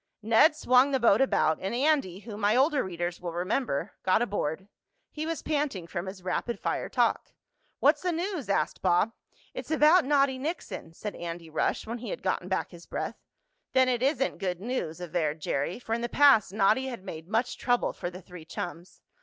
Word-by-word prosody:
Ned 230 +8 +5
swung 255 -2 +4
the 270 -2 +1
boat 230 -1 +4
about, 160 -11 +2
and 195 +5 -2
Andy, 265 - +1
whom 215 -1 -8
my 205 +2 +3
older 280 +2 +3
readers 175 -1 -4
will 175 -2 -4
remember, 185 - -1
got 190 +5 +3
aboard. 190 -4 -3 0.4
He 310 +1 -4
was 330 -1 -3
panting 285 - -1
from 175 +1 -5
his 190 -1 -8
rapid 235 +5 -2
fire - - -2
talk. - - 0 0.5
"What's - - +4
the 360 - 0
news?" 340 - -3
asked 155 -6 0
Bob. 185 +4 +3 0.4
"It's - - -7
about 315 +3 +5
Noddy 275 -1 +2
Nixon," 280 - -5
said 210 +3 -5
Andy 170 -1 -7
Rush, - - 0
when 230 +2 -5
he 245 - -6
had - - -5
gotten - - -1
back - - -2
his - - -13
breath. - - -4 0.5
"Then 260 -1 +5
it 245 -2 0
isn't 270 0 0
good 180 -2 -2
news," 200 -7 -3
averred 165 -3 -2
Jerry, 145 +2 -2
for 235 -2 -5
in 235 - -1
the 240 - -2
past 270 -10 +5
Noddy 215 +6 +2
had 240 -7 -6
made 160 -3 -8
much 225 +5 -1
trouble 245 -1 +1
for 175 - -4
the 180 +1 -11
three 180 -2 -11
chums. 175 +1 -7
220 Hz, 195 wpm, -28 LUFS, 180-265 Hz, 0.5 s, Ned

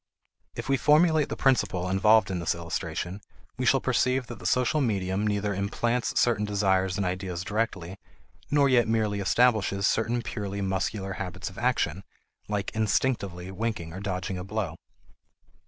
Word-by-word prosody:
If - - -5
we 135 0 +2
formulate 155 +2 +4
the - - -3
principle 95 -9 +1
involved 105 +2 +4
in 90 - -2
this 85 - 0
illustration, 90 +3 -4 0.4
we - - 0
shall - - +5
perceive 130 0 +1
that - - -9
the - - -3
social 125 +4 +2
medium 100 -4 0
neither 105 0 0
implants 115 +5 -1
certain 115 -4 +2
desires 95 -2 +1
and 100 - 0
ideas 90 -1 -3
directly, 100 -3 -3 0.5
nor 145 -1 +4
yet 125 -3 +4
merely 110 -2 0
establishes 100 -2 +2
certain 115 +2 +1
purely 100 -4 -4
muscular 95 0 -2
habits 90 0 -5
of 95 - -10
action, 100 -8 0 0.4
like 105 -2 -2
"instinctively" 105 -5 -1
winking 95 -5 -3
or 95 - -6
dodging 95 -2 -3
a - - -5
blow. 95 -4 -3
100 Hz, 155 wpm, -27 LUFS, 95-115 Hz, 0.5 s, shall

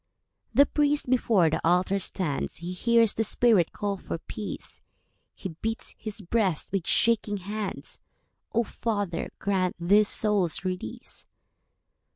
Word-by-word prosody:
The 280 - +6
priest 290 -3 +1
before 210 -10 +3
the - - -1
altar 180 +3 +2
stands, 180 -6 0
He 175 +2 -4
hears 230 +3 +3
the 225 - 0
spirit 215 -5 +3
call 205 -2 -3
for 180 - -5
peace; 205 +5 -6 0.5
He 190 - -6
beats 225 0 -3
his 215 -1 -4
breast 195 -4 0
with 190 -3 -2
shaking 215 -2 +2
hands. 205 +2 -5 0.5
"O 235 - +2
Father, 205 -6 -3
grant 190 -2 0
this 200 +5 +4
soul's 200 -5 +1
release. 180 -12 -5
200 Hz, 130 wpm, -27 LUFS, 180-225 Hz, 0.5 s, The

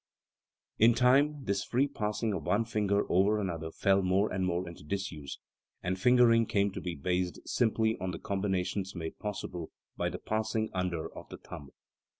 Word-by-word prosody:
207 115 - +7
In 120 - +3 0.4
time 140 -3 -11
this 100 0 0
free 130 +4 +1
passing 105 -4 -2
of 90 - -2
one 110 +3 +2
finger 105 -2 +1
over 100 +4 +3
another 85 -5 -3
fell 95 +3 +2
more 95 +3 +1
and 95 0 0
more 90 +1 -1
into 85 -3 -10
disuse, 75 -5 -4 0.5
and 90 +1 -1
fingering 120 -1 +5
came 100 0 +1
to - - -6
be 90 -2 -4
based 90 +4 -1
simply 110 -2 +2
on 95 - -1
the 85 - -4
combinations 95 -1 -2
made 80 -2 -6
possible 95 -5 -5 0.3
by - - -1
the - - -5
passing 110 0 -1
under 90 -3 -2
of - - -10
the - - -8
thumb. 70 -1 -10
100 Hz, 175 wpm, -31 LUFS, 90-110 Hz, 0.5 s, 207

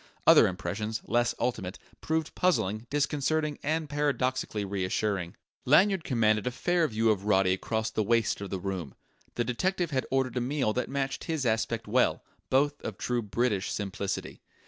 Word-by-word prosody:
Other - - +8
impressions, 105 +5 -3
less 120 0 +1
ultimate, 95 -6 -2 0.2
proved 160 0 -1
puzzling, 110 - 0
disconcerting, 150 +1 0
and 155 +1 -1
paradoxically 130 -7 -1
reassuring. 95 -1 -1 0.3
Lanyard 185 +6 +4
commanded 110 -5 +2
a - - +3
fair 170 +6 +1
view 110 -2 +2
of 100 -2 -2
Roddy 95 -3 +3
across 110 +3 -2
the 110 - 0
waist 115 0 +1
of 100 - -5
the 95 - -3
room. 90 -8 -4 0.4
The 120 - +1
detective 175 +8 -1
had 130 -2 -1
ordered 130 -2 0
a - - +1
meal 130 -3 0
that 125 - -2
matched 135 -1 -2
his 160 -5 -2
aspect 115 0 0
well 125 +4 +2 0.3
both 145 +2 +2
of 105 - -5
true 125 -1 -1
British 105 -2 -1
simplicity. 100 -1 -4
120 Hz, 160 wpm, -29 LUFS, 105-145 Hz, 0.4 s, Other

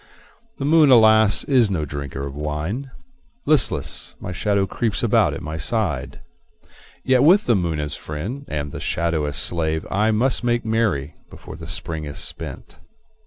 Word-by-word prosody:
The 135 - -3
moon, 155 -1 +5
alas, 110 -3 +5
is 125 -6 +3
no 85 -6 -1
drinker 70 -1 -6
of 70 - -6
wine; 75 - -4 0.6
Listless, 105 - +1
my - - -6
shadow 100 +1 0
creeps 110 +2 -2
about - - +2
at - - -8
my 80 +1 -5
side. 80 - -2 0.8
Yet 130 -1 +3
with 180 +9 +5
the 120 - +3
moon 85 -5 -1
as 75 -1 -2
friend 100 - -6
and 75 - -4
the - - -7
shadow 85 -2 -1
as 75 -1 -4
slave 80 0 -1
I 105 +3 +2
must 120 +4 +1
make 120 -1 0
merry 105 -11 -1
before - - -11
the 80 0 -10
Spring 80 -2 -4
is 70 - -7
spent. - - -5
90 Hz, 165 wpm, -21 LUFS, 75-115 Hz, 0.8 s, moon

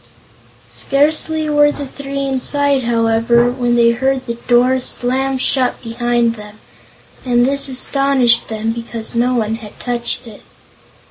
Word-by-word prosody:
Scarcely 310 +2 0
were 295 -1 +3
the 285 - -6
three 275 0 -5
inside, 275 0 0
however, 230 +1 +2
when 245 -1 -1
they 235 -1 +4
heard 265 +2 -1
the 235 - -3
door 245 +2 +2
slam 260 +2 -1
shut 255 -1 0
behind 240 0 0
them, 210 -1 -13 0.6
and 245 -1 +2
this 280 +1 +2
astonished 260 -2 +2
them 220 0 -2
because 230 0 -1
no 245 +2 +1
one 220 -2 -1
had 215 -3 -13
touched 240 0 -4
it. 220 -3 -13
245 Hz, 135 wpm, -16 LUFS, 235-270 Hz, 0.6 s, they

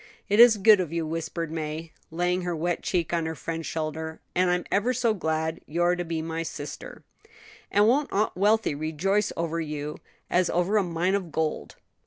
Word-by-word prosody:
"It 205 +2 +3
is 235 -2 +9
good 210 0 +6
of 175 -4 -2
you," 165 -1 -1
whispered 165 0 -4
May, 160 0 -4 0.2
laying 180 +2 0
her 175 -1 -2
wet 170 +2 -1
cheek 175 -3 -1
on 165 -1 0
her 160 - -4
friend's 165 +1 -5
shoulder; 160 0 -4
"and 180 0 +2
I'm 180 0 0
ever 235 +6 +2
so 235 -2 +2
glad 160 -4 -2
you're 175 +3 +2
to 175 - -3
be 165 -2 -3
my 165 0 -3
sister." - - -7 0.7
"And 205 +1 +4
won't 280 +5 +2
Aunt 210 +2 0
Wealthy 210 0 +2
rejoice 165 +7 0
over 165 0 -1
you 150 -1 -5 0.3
as 180 0 +2
over 180 +5 +1
a 205 - +3
mine 175 +2 0
of 190 -5 -2
gold!" 160 -1 -2
170 Hz, 190 wpm, -26 LUFS, 160-195 Hz, 0.7 s, is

